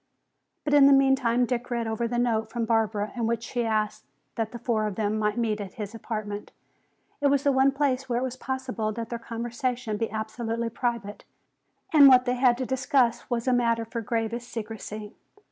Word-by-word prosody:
But 290 - -1
in 285 -1 +8
the 280 - +7
meantime 265 -3 +3
Dick 245 0 -3
read 235 -1 -1
over 225 +1 -1
the 240 +1 -2
note 230 -2 +1
from 235 -1 -1
Barbara 220 -2 0
in 235 -2 -1
which 230 0 -1
she 240 0 -2
asked 215 -2 -1 0.3
that 225 -1 -2
the 240 - -6
four 220 -2 0
of 205 - -4
them 215 0 -1
might 210 +1 0
meet 220 -3 0
at 195 -2 -8
his 210 -1 -6
apartment. 215 -2 -5 0.7
It 285 - +4
was 280 -1 +2
the 285 - +4
one 265 +1 +4
place 270 -2 0
where 240 - +1
it 250 - 0
was 255 -1 -3
possible 255 -4 -3
that 230 +1 -5
their 235 - -4
conversation 235 0 -3
be 225 +1 -1
absolutely 225 +1 -3
private. 230 -3 -3 0.7
And 290 -3 +9
what 255 -1 +7
they 250 - +1
had 250 -1 +3
to 260 - -2
discuss 255 -2 +1
was 240 0 -2
a 255 - +4
matter 230 -2 +1
for 230 +1 -5
gravest 230 +2 -3
secrecy. 215 -2 -6
235 Hz, 200 wpm, -26 LUFS, 220-250 Hz, 0.7 s, And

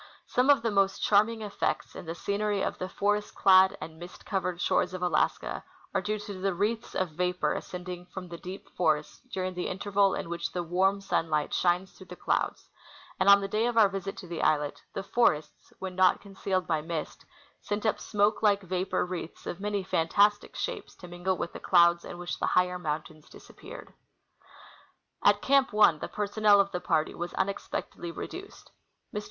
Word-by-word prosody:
Some 255 +3 +1
of 280 -5 +5
the 230 - +1
most 195 -1 +1
charm 210 +2 +5
ing 225 -1 -6
effects 205 -1 -2
in - - -8
the 165 - -4
scenery 200 +2 -1
of - - -3
the 185 - -4
forest 205 +2 -1
clad 190 -1 +6
and 160 +1 -9
mist 175 +1 -11
coA^ered 185 -3 -2
shores 180 +1 +1
of 180 - -5
Alaska 180 - 0 0.3
are - - +1
due 215 +1 -2
to 205 0 -7
the 195 -1 0
wreaths 220 +5 -2
of 185 -3 -1
vapor 180 -2 0
ascending 180 0 -6
from 180 0 -8
the 170 -1 -9
deep 185 +2 -8
forests 155 -3 0
during 185 0 -2
the 180 0 -3
interval 200 +1 +1
in - - -4
Avhich 170 0 -4
the 175 -1 -2
AA^arm 190 +3 +1
sunlight 155 -5 0
shines 180 +2 +1
through 190 - -15
the 180 - -9
clouds; - - -1 0.5
and 190 +1 +4
on 200 0 +8
the 195 - -2
day 215 +4 +1
of 240 -1 -2
our 220 -2 +7
visit 195 0 -5
to 185 - -9
the 170 -1 -4
islet, 150 -2 +1
the - - -4
forests, 190 -8 0
when 190 -1 -6
not 185 0 +4
concealed 195 -2 -2
by 160 -2 0
mist, 160 0 -5 0.4
sent 205 +2 -3
up 220 - +1
smoke 205 +1 +1
like 205 -2 +3
A^apor 185 0 -1
wreaths 175 -2 -6
of 175 - -5
many 205 -1 -2
fantastic 200 +5 +2
shapes - - -4
to 180 - -12
mingle 175 +2 -2
with 170 - -4
the - - -7
clouds 170 -1 +4
in - - -8
Avhich 175 0 -5
the - - 0
higher 180 0 +2
mountains 155 -1 -5
disappeared. - - -12 1.3
At - - +4
Camp 275 -1 +4
1 210 -7 +5
the - - -4
personnel 210 0 +3
of 200 0 +2
the 180 - -3
party 155 0 +1
Avas 175 +1 -5
unexpectedly 190 -2 -3
re - - -5
duced. 390 +3 -11 0.4
Mr. 210 - -1
185 Hz, 195 wpm, -28 LUFS, 175-205 Hz, 1.3 s, on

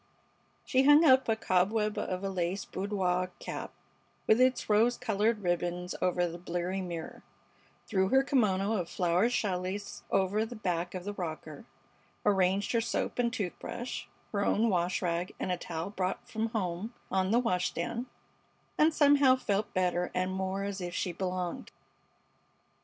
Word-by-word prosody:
She 260 - +3
hung 290 +4 +7
up 260 -4 +5
a 225 - +3
cobweb 210 +1 +1
of 185 +1 -3
a 195 - -1
lace 185 +1 -2
boudoir 185 -2 -1
cap - - -6 0.5
with 220 +3 +4
its 255 -1 +3
rose 225 +3 +3
colored 210 +1 0
ribbons 175 0 -1
over 180 -1 +2
the 170 +1 -7
bleary 175 +2 -2
mirror, 170 -3 -6 0.6
threw 190 -2 +1
her 265 +1 +5
kimono 215 -6 +2
of 175 -3 -3
flowered 180 +5 +2
challis 195 -3 -2
over 195 +3 +2
the 235 +2 -6
back 180 -4 -2
of 180 - -5
the 205 +2 -4
rocker, 160 -2 -6 0.6
arranged 195 0 +2
her 230 - +2
soap 230 - -2
and 235 -1 +2
toothbrush, 235 +3 -4 0.3
her 200 -1 0
own 220 +2 +2
wash 180 +1 0
rag 175 +1 -1
and 185 - -2
a 180 - 0
towel 170 +2 -5
brought 185 -2 -3
from 220 0 -2
home 215 +1 -3 0.2
on 190 0 +1
the 225 - +3
wash 185 -7 +1
stand, 235 +9 -3 0.7
and 310 +1 +4
somehow 285 -3 +6
felt 210 -5 -1
better 180 -1 0
and 185 +1 0
more 190 +1 -2
as 200 -1 -4
if 175 0 -4
she 180 - -1
belonged. 180 0 -3
190 Hz, 160 wpm, -30 LUFS, 180-225 Hz, 0.7 s, hung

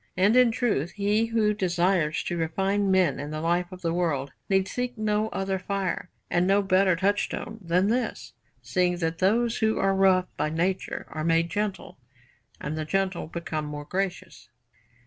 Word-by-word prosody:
And 200 +5 +4
in 250 -1 +6
truth, 215 - -1
he 210 +3 +1
who 220 -2 +2
desires 175 -4 +1
to 175 - -3
refine 195 +5 0
men 185 -7 +3
in 145 +1 -5
the 155 0 -4
life 175 +3 0
of 185 0 -10
the 165 -1 0
world 155 -6 -1 0.2
need 190 -1 +2
seek 250 -1 -3
no 215 0 0
other 195 -2 -2
fire 190 -1 -3 0.2
and 175 +1 +1
no 200 +1 +3
better 190 -1 +3
touchstone 205 +4 -1
than 180 +3 +1
this, 215 - -2 0.3
seeing 175 +9 +1
that 165 -1 -2
those 230 +5 +2
who 220 -1 +2
are 195 0 +2
rough 190 -1 +4
by - - 0
nature 175 +4 -2
are 155 0 -4
made 165 +1 +2
gentle, 205 -8 -3 0.6
and 150 +1 -4
the 155 - -2
gentle 190 +1 -1
become 160 -2 -4
more 150 0 -6
gracious. 185 +2 -4
185 Hz, 170 wpm, -26 LUFS, 165-205 Hz, 0.6 s, in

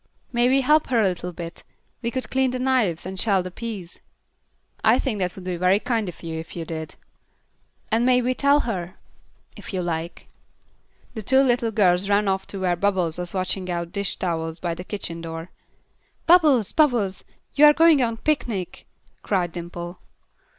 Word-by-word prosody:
"May 240 +1 +3
we 270 +1 +4
help 300 +4 +3
her 245 -3 +2
a 210 - +4
little 180 -1 -3
bit? 170 -1 -8 0.4
We 235 - -1
could 255 +2 -4
clean 265 0 +2
the 255 - -3
knives, 250 -11 +1
and 190 0 -5
shell 195 -4 +2
the 185 - -7
peas." 205 -4 -6 0.8
"I - - +5
think 230 -7 -2
that 180 -1 -2
would 190 - -10
be 180 -1 -3
very 185 +3 +3
kind 225 -4 -1
if 175 - -12
you 165 0 -6
did." 160 -1 -6 1.0
"And 225 +2 +2
may 250 0 +4
we 255 +1 +1
tell 280 +3 +3
her?" 185 -7 -4 0.6
"If - - -8
you 180 - -1
like." 170 0 -4 0.9
The 220 - -5
two 265 +6 +4
little 245 -3 +2
girls 195 -3 +2
ran 205 0 +3
off 190 0 -1
to 195 - -6
where 180 -2 +1
Bubbles 180 -3 0
was 175 +1 -3
washing 185 0 -2
out 170 -1 -3
dish 200 0 -2
towels 165 -2 -3
by 175 -2 -2
the 175 - -7
kitchen 175 -4 -5
door. 165 +1 -7 0.7
"Bubbles! 305 - +5
Bubbles! 240 -11 +2 0.3
You 295 +2 +6
are 295 - +8
going 320 -3 +5
on 230 -2 0
a - - -16
picnic," 225 - -2 0.3
cried 180 -4 0
Dimple. 175 +1 -7
195 Hz, 180 wpm, -23 LUFS, 175-245 Hz, 1.0 s, are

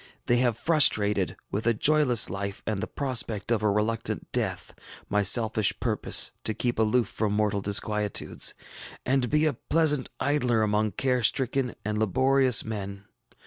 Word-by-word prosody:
They 120 - +2
have 120 -3 +1
prostrated, 105 - +3 0.2
with 110 +3 -3
a 115 - +2
joyless 145 -2 +4
life 100 +1 -6
and 105 -3 -3
the 110 - -4
prospect 115 -6 -2
of 115 -3 +1
a 105 - +1
reluctant 110 +3 -2
death, - - -3 0.4
my 105 - +1
selfish 110 0 +2
purpose - - +1
to 110 - -1
keep 120 -2 -2
aloof 110 +2 +1
from 105 -2 -3
mortal 105 -1 0
disquietudes, 105 +1 0 0.5
and 130 -1 0
be 150 +1 +2
a 155 - +1
pleasant 150 -4 0
idler 125 -5 0
among 105 -1 0
care 125 +3 -1
stricken 130 +2 0
and 105 0 -2
laborious 130 +4 +2
men. 100 -2 -7
110 Hz, 150 wpm, -26 LUFS, 105-130 Hz, 0.5 s, joyless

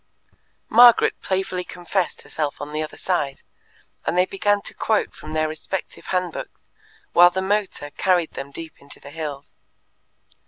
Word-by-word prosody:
Margaret 240 0 +7
playfully 190 -1 -1
confessed 180 +1 -3
herself 150 -2 -3
on 150 +1 -6
the 155 - -1
other 155 - -6
side, 145 -7 -1 0.6
and 175 - -1
they 180 - +5
began 205 +2 +1
to - - -4
quote 220 -1 0
from 155 - -9
their 155 0 +1
respective 155 +4 -5
hand 180 -2 0
books - - -8 0.5
while 175 +1 +8
the 185 - -3
motor 190 -6 -1
carried 180 -2 +1
them 135 +1 -6
deep 160 +3 -9
into 140 - -10
the 140 - -12
hills. 145 -3 -6
175 Hz, 155 wpm, -23 LUFS, 155-190 Hz, 0.6 s, while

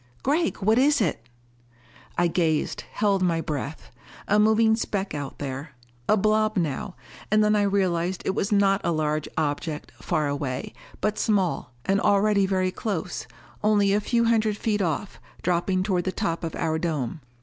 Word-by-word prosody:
"Gregg, 315 +5 +1
what 220 +4 +4
is 285 +2 +4
it?" 130 - -1 0.9
I 175 - +3
gazed, 165 -3 0
held 200 -2 +1
my 170 -3 +2
breath. 150 -1 -5 0.4
A 210 - +3
moving 220 +1 +4
speck 200 -5 -2
out 145 -2 -5
there. 140 +1 -5 0.4
A 215 - +5
blob 215 +1 +2
now. 175 +3 -2 0.3
And 215 +1 +4
then 210 0 +3
I 210 - +3
realized 185 -3 0
it 190 - +1
was 195 - -1
not 200 -1 +3
a - - +1
large 155 -1 -1
object, 150 0 -2
far 155 -5 0
away, 140 -2 -3 0.3
but 215 0 0
small, 185 - 0
and 195 +1 +2
already 200 -1 +3
very 185 -1 +1
close 180 -4 -4 0.4
only 205 -2 +3
a 205 - +2
few 235 +2 +1
hundred 220 -2 +2
feet 210 -2 0
off, 175 +3 -2 0.2
dropping 180 +1 +1
toward 185 -3 0
the 185 - 0
top 170 -5 -2
of 165 - -3
our 160 -1 -1
dome. 155 -4 -2
190 Hz, 165 wpm, -25 LUFS, 160-210 Hz, 0.9 s, A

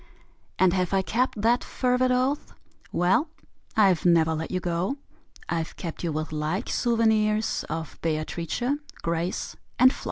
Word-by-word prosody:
And 185 -2 +4
have 185 -1 0
I 190 - +2
kept 240 +2 0
that 240 +2 +3
fervid 250 0 +1
oath? 255 +3 0 0.4
Well 185 - +2 0.5
I've 195 -6 +4
never 165 -2 +4
let 160 +1 -3
you 185 - -1
go: 180 +9 -1 0.5
I've 165 -1 -2
kept 170 0 -6
you 170 - 0
with 155 +1 -3
like 155 +8 -2
souvenirs 220 -2 +2
Of 160 -1 -5
Beatrice, 165 +5 -2 0.4
Grace 170 +2 -2 0.2
and 255 +2 +6
Flo. - - -10
185 Hz, 140 wpm, -26 LUFS, 165-230 Hz, 0.5 s, and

